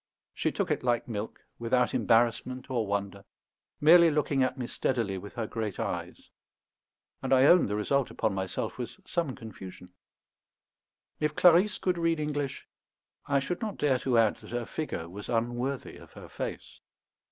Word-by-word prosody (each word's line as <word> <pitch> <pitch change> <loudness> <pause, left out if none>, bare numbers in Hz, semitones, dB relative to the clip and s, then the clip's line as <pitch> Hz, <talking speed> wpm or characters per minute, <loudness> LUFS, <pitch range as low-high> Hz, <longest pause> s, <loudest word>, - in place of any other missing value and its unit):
She - - -1
took - - -2
it - - 0
like 120 -2 0
milk, 110 -2 -5 0.2
without 125 +1 +1
embarrassment 120 +3 +1
or 115 -4 0
wonder, 100 -1 -3 0.6
merely 170 +2 +7
looking 145 -2 +1
at 130 +1 +1
me 125 - -3
steadily 115 -6 -1
with 100 +4 -11
her 115 -2 -2
great 110 -3 -4
eyes; - - -5 0.9
and - - -3
I 130 -1 +6
own 175 +4 +6
the 105 - -2
result 130 +5 +1
upon 110 -3 -1
myself 95 +4 -3
was 120 0 -6
some 165 -7 -2
confusion. 95 -5 -11 1.3
If 150 0 0
Clarisse 180 +3 +5
could 180 -2 -1
read 165 -1 +1
English, 145 -2 -3 0.6
I 140 - +2
should 175 +6 -3
not 215 -3 -3
dare 135 -3 +2
to 125 -2 +1
add 110 -2 +4
that - - -14
her 120 -1 -3
figure 110 - -4
was 100 +4 -9
unworthy 120 +3 -2
of - - -15
her - - -11
face. - - -6
125 Hz, 165 wpm, -29 LUFS, 110-145 Hz, 1.3 s, merely